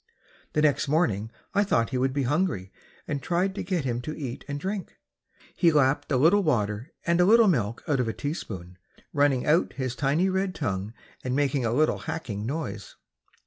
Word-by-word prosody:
The 150 - +2
next 145 -1 +2
morning 115 - +1 0.2
I 205 +1 +4
thought 115 - +1
he 130 - 0
would 130 +1 +1
be 140 +1 -1
hungry 140 - 0 0.4
and 145 -2 -2
tried 180 +7 0
to - - -4
get 175 -5 -1
him 120 -1 -1
to 155 +5 -6
eat 130 -5 -5
and 145 -1 -4
drink. 195 +3 -4 0.6
He 170 -3 +4
lapped 145 0 +2
a 130 - +3
little 170 +10 +5
water 115 - 0
and 170 +1 +3
a - - +5
little 225 +2 +6
milk 115 - 0
out 145 -3 +1
of 125 - +1
a 115 - -1
teaspoon, 95 - -6 0.3
running 140 -3 +2
out 155 +4 +3
his 130 -1 -3
tiny 145 +7 +2
red 190 0 -1
tongue 105 -4 -3 0.3
and 125 0 -1
making 140 -2 +1
a 115 - +1
little 155 +6 +2
hacking 105 -8 -4
noise. 155 +4 -5
145 Hz, 190 wpm, -26 LUFS, 120-170 Hz, 0.6 s, little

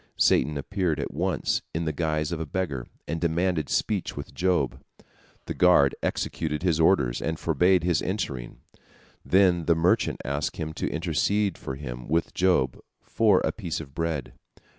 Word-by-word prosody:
Satan 75 +3 +3
appeared 85 0 -1
at 70 - -4
once, - - 0
in 80 +1 -1
the 80 - -1
guise 75 0 -1
of 85 - -2
a 80 - -3
beggar, 70 -7 -3 0.2
and 80 +2 -3
demanded 85 -1 0
speech 100 -8 -1
with 70 - -7
Job. 85 -8 0 0.6
The - - -3
guard 90 -7 +5
executed 75 -1 -2
his 85 -4 +2
orders, 70 -8 +3
and 80 0 -2
forbade 90 +3 +2
his 85 -3 +2
entering. 75 - -4 0.6
Then 90 -3 +3
the 85 - +4
mendicant 85 +2 +2
asked 70 +1 -2
him 80 -1 -4
to - - -2
intercede 90 +5 0
for 65 - -6
him 60 -3 -7
with 80 +3 0
Job 90 -9 +2 0.2
for 105 -4 +3
a - - 0
piece 90 -8 -4
of 70 -4 -10
bread. 80 -4 -3
80 Hz, 160 wpm, -26 LUFS, 75-90 Hz, 0.6 s, guard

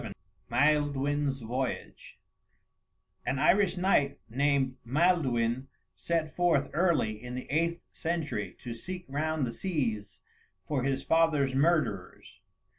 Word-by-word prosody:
XI 105 -4 -6 0.4
MAELDUIN'S 145 -1 +1
VOYAGE 125 +3 -4 1.1
An 135 - -1
Irish 180 +6 +3
knight 180 -7 +2
named 135 +1 +1
Maelduin 130 -4 +1 0.3
set 165 -2 -2
forth 165 -6 +2
early 150 -11 +1
in 125 0 -6
the 125 - -5
eighth 170 +3 0
century 165 -2 -3
to 120 -3 -4
seek 180 +10 -7
round 155 +1 -1
the 115 - -4
seas 110 - -2 0.5
for 140 -3 0
his 135 +1 -1
father's 155 -5 +3
murderers. 135 - 0
140 Hz, 115 wpm, -30 LUFS, 125-165 Hz, 1.1 s, Irish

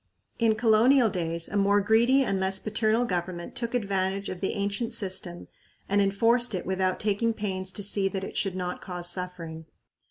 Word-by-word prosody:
In 225 -2 +3
colonial 230 +2 +4
days 170 -2 -2
a - - -6
more 200 0 +3
greedy 235 +6 +4
and 195 -6 -1
less 190 0 +2
paternal 220 +2 +1
government 175 -3 -4
took 235 0 -2
advantage 195 -3 -1
of 185 - -6
the 195 - 0
ancient 205 +4 -2
system 190 -4 -4 0.4
and 200 +1 +2
enforced 230 +3 +2
it 180 - -4
without 185 0 0
taking 220 +2 0
pains 190 -3 -3
to 205 - -3
see 200 -1 +1
that 195 0 -4
it - - -7
should 195 -2 -1
not 180 -1 -4
cause 175 -2 -4
suffering. 170 -3 -6
195 Hz, 180 wpm, -27 LUFS, 185-220 Hz, 0.4 s, colonial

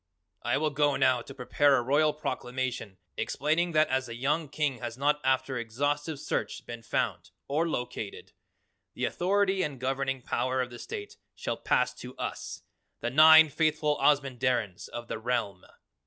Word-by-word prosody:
"I 120 - +1
will 155 +1 0
go 145 0 +2
now 125 -2 +3
to 135 - -11
prepare 135 +2 +3
a 120 - 0
Royal 145 +4 +3
Proclamation 130 -7 -4 0.2
explaining 160 +5 0
that 155 0 +4
as 130 0 0
the 115 - -7
young 145 +5 0
King 145 -3 -1
has 120 -1 -5
not 150 +2 +1
after 130 -1 +1
exhaustive 145 +6 -2
search - - -3
been 120 -1 -7
found 90 -5 -2 0.2
or 160 +4 0
located, 120 -7 -5 0.6
the - - -1
authority 195 +1 +1
and 145 -6 -3
governing 135 0 -2
power 130 +2 -1
of 125 -1 -1
the 120 - -9
state 415 -1 -7 0.2
shall - - -3
pass - - +1
to - - -9
us, - - -5 0.4
the - - -2
Nine 160 +2 +8
Faithful 155 0 +1
Ozamandarins 130 -8 +1
of 120 0 -7
the - - -4
Realm! 110 -5 -2
135 Hz, 160 wpm, -29 LUFS, 125-150 Hz, 0.6 s, Nine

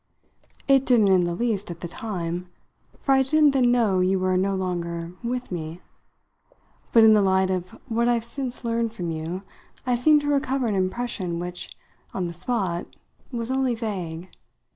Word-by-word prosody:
"It 270 -1 +5
didn't 235 -6 +4
in 185 -2 +4
the 175 0 -2
least 215 -3 -1
at 170 0 -7
the 175 - -4
time, 180 -4 -4 0.5
for 275 - -1
I 265 0 +6
didn't 295 +2 +4
then 255 -3 +3
know 220 -6 +3
you 185 +1 +2
were 185 0 +1
no 195 +1 +1
longer 170 -2 -3
'with' 245 0 -3
me. 165 -1 -5 1.1
But 230 - +7
in 220 0 +8
the 210 - +5
light 190 -1 +2
of 185 -1 -4
what 235 0 +1
I've 235 -1 +1
since 250 0 -4
learned 230 -1 0
from 175 -7 -4
you 165 +4 -4 0.4
I 250 - +1
seem 300 +5 +5
to 290 - -4
recover 275 -2 +1
an 220 - 0
impression 185 -2 -2
which, 180 +1 -6 0.4
on 190 - -1
the 170 -1 -3
spot, 185 -2 -2 0.4
was 235 0 -3
only 260 -2 +1
vague. 185 -6 -5
200 Hz, 175 wpm, -24 LUFS, 180-245 Hz, 1.1 s, in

